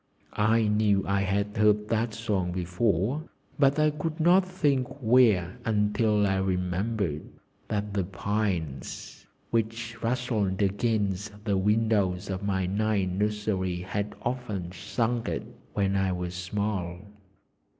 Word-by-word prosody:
I 110 +2 +3
knew 105 -2 +2
I 100 0 +2
had 100 +1 -1
heard 105 0 +3
that 115 -1 0
song 100 -6 -1
before, 95 - 0 0.3
but 140 0 +4
I 155 0 +4
could 155 +2 -4
not 175 +4 +5
think 145 -9 +1
where 110 -8 +4
until 105 0 +2
I 95 -1 +1
remembered 95 -2 -1 0.4
that 105 -1 -2
the 100 -2 +1
pines 90 - -3 0.2
which 115 +1 -2
rustled 115 -5 0
against 105 0 0
the 105 -3 +1
windows 105 -3 +1
of 95 - -3
my 95 -2 0
night 100 0 +1
nursery 95 -2 -1
had 100 +3 -3
often 110 -8 -3
sung 115 +5 -1
it - - -2 0.3
when 100 -3 +1
I 95 -1 +1
was 90 0 -4
small. 90 -1 -2
105 Hz, 125 wpm, -28 LUFS, 95-115 Hz, 0.4 s, not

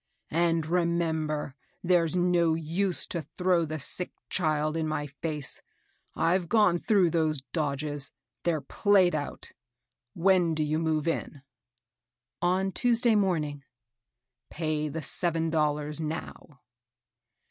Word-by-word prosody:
And 165 0 +2
remem 170 -1 0
ber, 150 -2 -3 0.3
there's 175 -1 +2
no 175 -2 +3
use 170 +4 0
to 170 - -3
throw 180 +1 0
the 155 0 -4
sick 175 +5 -3 0.2
child 155 -3 0
in 160 -1 -1
my 155 -1 -2
face. 150 0 -5 0.5
I've 175 +1 +1
gone 210 -6 +4
through 195 -6 +3
those 155 -3 +1
dodges, 145 -1 -2 0.2
— - - -57
they're 165 -3 0
played 190 +5 +3
out. 150 -2 -4 0.6
When 180 -2 +3
do 155 - 0
you 155 +1 0
move 160 -1 0
in? 145 -4 -3 0.3
" 115 0 -51
" 115 - -64 0.2
On 185 +2 +1
Tuesday 235 +1 +3
morning." 160 -9 0 0.4
" 125 -1 -60
Pay 155 -2 -2
the 155 +2 -5
seven 165 +2 0
dollars 150 0 0
now." 155 -3 -6
160 Hz, 135 wpm, -28 LUFS, 150-175 Hz, 0.6 s, gone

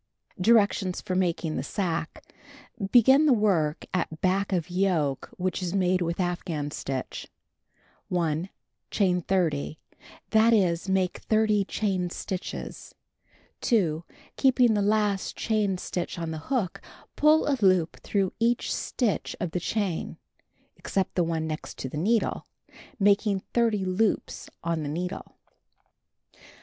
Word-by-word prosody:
Directions 200 -3 +3
for 185 - -4
Making 175 -3 0
the - - -2
Sacque: 165 0 -3 0.7
Begin 265 +5 +6
the 275 - +6
work 180 -9 +1
at 160 -3 -2
back 195 +2 +1
of 180 -3 0
yoke 175 -7 0
which 185 0 -2
is 180 +1 -2
made 185 -1 +2
with 170 +1 -2
afghan 170 -5 -2
stitch. 135 -3 -5 0.8
1. 170 0 -1 0.4
Chain 180 -3 +1
30; 160 -5 0 0.5
that 225 +1 +5
is, 180 -4 +2
make 190 -1 +1
30 215 -2 +2
chain 190 -4 -1
stitches. 185 +1 -6 0.7
2. 175 - +1 0.3
Keeping 255 -3 +4
the 205 - +1
last 205 -1 +1
chain 210 -4 0
stitch 180 0 -4
on 165 -1 -3
the 160 - -4
hook, 240 -10 -1 0.3
pull 305 +1 +4
a 285 - +3
loop 185 -4 +3
through 195 -3 -1
each 235 +1 +1
stitch 235 -6 -1
of 175 - -2
the 180 - -1
chain 195 -2 -2 0.6
(except 195 -2 -2
the 180 - +2
one 165 -1 -1
next 155 -1 -5
to - - -4
the 130 - -7
needle) 220 +8 0 0.5
making 200 -1 +3
30 225 -5 +2
loops 195 +3 -1
on 165 -1 -1
the 145 - -3
needle. 180 +5 -5
185 Hz, 130 wpm, -27 LUFS, 170-210 Hz, 0.8 s, Begin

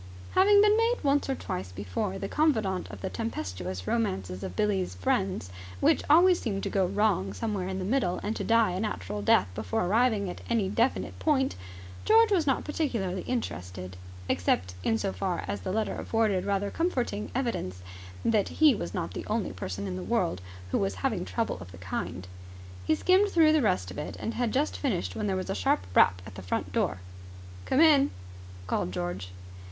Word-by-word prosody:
Having 405 +2 +6
been 420 0 +5
made 455 +2 +3
once 280 0 +2
or 270 - +1
twice 90 - -5
before 95 0 -3
the - - -4
confidant 220 -12 +1
of 100 -3 -9
the - - -3
tempestuous 95 -3 -4
romances 95 - -1
of 95 -2 -6
Billie's 195 - 0
friends, 90 0 -1 0.3
which - - +3
always 350 +4 +6
seemed 200 -5 -3
to - - -2
go 190 -2 +2
wrong 195 - +1
somewhere 200 - -2
in 190 0 -3
the 185 - -3
middle 200 -5 +1
and 215 +2 -2
to - - -3
die 230 -3 +3
a 180 - -3
natural 105 - -3
death 100 -1 +4
before 105 - -1
arriving 215 0 +2
at 180 - -6
any 220 -5 +1
definite 230 +5 0
point, 275 -4 +1 0.5
George 450 0 +5
was 340 -7 +2
not 270 - +2
particularly 225 - -2
interested, 90 - -4 0.3
except 90 +1 0
in 110 - +2
so 95 - -2
far 95 - -2
as 100 -1 -3
the - - -3
letter 220 +2 0
afforded 215 -5 0
rather 200 0 0
comforting 250 - -1
evidence 95 - -2 0.4
that 215 -3 +2
he 310 -3 +5
was 85 - -5
not - - -3
the - - -6
only - - -1
person 95 +2 -5
in 90 -2 -4
the - - -5
world 90 0 0 0.3
who - - +2
was 95 0 -1
having - - 0
trouble 95 0 -2
of 90 +1 -10
the 85 - -12
kind. 90 0 -5 0.6
He - - +4
skimmed 375 - +3
through 320 -4 +5
the 310 - +4
rest 90 - 0
of 95 - -7
it, - - -5
and 225 - -3
had 240 -2 -1
just 285 +6 0
finished 235 -12 -1
when 210 -1 -2
there 190 - 0
was 185 - -3
a - - 0
sharp 95 -1 +1
rap 90 0 +4
at 110 - -10
the 95 - -8
front 90 - -3
door. 95 - 0 0.7
"Come 270 - +3
in!" 290 -4 +6 0.6
called 90 - -1
George. 90 +1 -4
190 Hz, 195 wpm, -28 LUFS, -, 0.7 s, Having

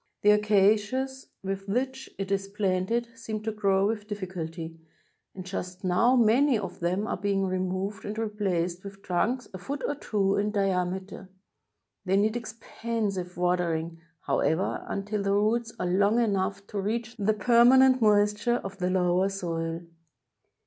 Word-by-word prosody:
The 210 - +7
acacias 210 +6 +2 0.2
with 195 +1 -4
which 260 +4 -2
it 195 0 -4
is 195 0 0
planted 200 +3 0
seem 220 -2 -5
to 220 - -1
grow 195 -2 +2
with 210 0 -2
difficulty, 170 -5 -6 0.6
and 185 -1 -7
just 185 0 -6
now 190 +8 +3
many 245 +3 +4
of 190 -3 -6
them 180 +4 0
are - - -2
being 195 0 0
removed 185 +2 -2
and 210 +1 -5
replaced 190 -5 -1
with 200 0 -10
trunks 240 +8 0
a 185 - -7
foot 275 +9 -5
or - - 0
two 200 -8 0
in 205 +1 +1
diameter. 190 -1 -2 0.7
They 190 0 +2
need 215 +3 +2
expensive 220 -5 -4
watering, 170 -2 -1 0.2
however, 160 +6 0
imtil 200 +1 -2
the 200 0 +1
roots 225 +3 +1
are - - -1
long 200 +5 +3
enough 200 -3 0
to 205 0 -4
reach 225 +3 -3
the 210 0 +1
permanent 250 +3 +5
moist 210 -1 +3
ure 240 - +4
of 195 -4 -6
the 180 0 0
lower 185 +1 +2
soil. 165 -3 -3
200 Hz, 150 wpm, -27 LUFS, 185-220 Hz, 0.7 s, The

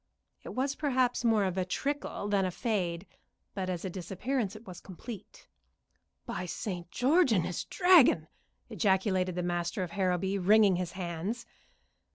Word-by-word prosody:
It - - -9
was 270 +2 0
perhaps 260 -5 +1
more 225 -3 +3
of 190 -1 -1
a - - +2
trickle 280 +2 -3
than 200 -1 +2
a 185 - 0
fade, 180 -4 -2 0.5
but 190 -2 -3
as 180 -1 -3
a - - -2
disappearance 200 +5 -3
it 215 +2 -12
was 180 -3 -9
complete. 205 +3 -10 0.8
"By 180 +1 -4
St. 175 -1 -5
George 275 - +3
and 185 -6 +3
his 175 - -3
Dragon!" 340 - +5 0.4
ejaculated 190 -3 +1
the 180 - -2
master 175 +2 -1
of 175 - -6
Harrowby, 190 +1 0
wringing 200 0 +5
his 180 -1 -3
hands. 185 +5 -4
195 Hz, 155 wpm, -30 LUFS, 180-230 Hz, 0.8 s, Dragon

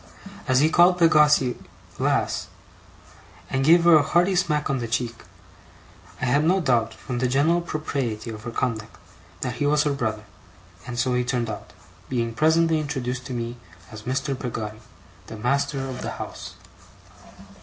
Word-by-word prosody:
As 130 0 +4
he 155 - +4
called 175 +2 +5
Peggotty 150 -6 +4 0.4
'Lass', - - 0 1.0
and 135 0 0
gave 165 +4 +6
her 170 -2 +7
a - - +4
hearty 175 +6 +2
smack 150 -4 +1
on 135 -1 -1
the 120 - -3
cheek, 115 +1 -2 1.0
I - - -1
had 140 +5 +2
no 180 +4 +3
doubt, 115 -8 +1
from 125 +1 -5
the 125 - +1
general 150 +7 +2
propriety 135 -9 -3
of 110 -1 -8
her 120 - -6
conduct, 115 -2 -3 0.4
that 125 -2 -3
he 145 - 0
was 150 0 +3
her 145 - 0
brother; 110 -5 -2 0.6
and 120 -1 -5
so 125 +1 +1
he 125 0 +1
turned 120 -2 -1
out 105 - -9 0.4
being 115 -3 -1
presently 160 +4 +3
introduced 130 -3 -3
to 130 - -5
me 120 0 -4 0.3
as 110 -1 -9
Mr. 135 +4 -2
Peggotty, 110 -4 -5 0.5
the 110 - -8
master 135 +3 0
of 130 -1 -6
the - - -3
house. - - -8
130 Hz, 165 wpm, -24 LUFS, 120-150 Hz, 1.0 s, her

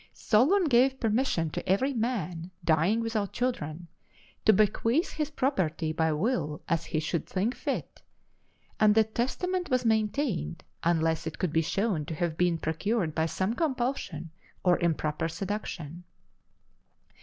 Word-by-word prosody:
Solon 290 - +3
gave 265 -2 +3
permission 220 - +1
to - - -5
every 260 +9 +2
man 190 -8 -2 0.2
dying 170 +8 +3
without 220 -3 -2
children 175 -10 -2 0.6
to - - +8
bequeath 225 - +2
his 305 -1 -2
property 180 - 0
by 160 0 +1
will 155 - -1
as 170 -2 0
he 155 - -1
should 160 +2 -2
think 200 +6 0
fit; - - -4 0.8
and 210 -1 +5
the 220 - +6
testament 350 - -2
was 255 -1 +1
maintained 215 - 0 0.2
unless 165 -1 +1
it 160 - -5
could 175 -4 -1
be 160 - +4
shown 195 0 0
to 160 - -5
have 165 0 -1
been 175 0 +2
procured 165 +2 -1
by 160 +1 +1
some 190 +6 -1
compulsion 245 - -2 0.3
or 180 -2 +4
improper 160 -1 0
seduction. 175 -3 -5
195 Hz, 140 wpm, -28 LUFS, 160-240 Hz, 0.8 s, to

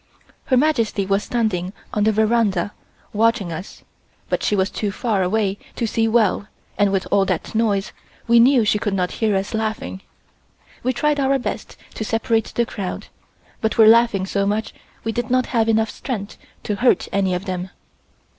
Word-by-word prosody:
Her 260 -4 +2
Majesty 235 -8 +1
was 200 +1 +1
standing 200 -6 -1 0.2
on 210 0 +1
the 220 - +4
veranda 215 -3 +1 0.4
watching 220 -3 +1
us 165 +4 -8 0.5
but - - 0
she 210 - +1
was 190 0 +1
too 205 -2 -2
far 205 0 -1
away 200 +1 0 0.2
to 235 - -1
see 225 0 +1
well 220 -3 +2 0.3
and 205 -1 +2
with 195 -1 0
all 195 - +4
that 185 -4 -2
noise, 215 -3 0 0.4
we 235 0 +6
knew 245 -1 +5
she 210 0 +2
could 205 -2 -1
not 180 -1 0
hear 215 -2 +2
us 195 +3 -2
laughing. 220 -3 -3 0.8
We 255 - +1
tried 295 +4 0
our 275 0 +2
best 255 - -5 0.2
to - - -4
separate 225 0 0
the 235 - +2
crowd, 195 -5 -6 0.5
but 220 - -1
were 220 - +7
laughing 225 -3 +5
so 200 +1 -1
much 215 +2 -1 0.3
we 225 - -1
did 240 +2 -3
not 255 0 +2
have 225 -2 +2
enough 220 -1 +2
strength 210 -6 -5 0.3
to 210 - -2
hurt 250 +3 +3
any 190 -2 +1
of 180 +2 -4
them. 185 -1 -4
215 Hz, 180 wpm, -21 LUFS, 195-230 Hz, 0.8 s, were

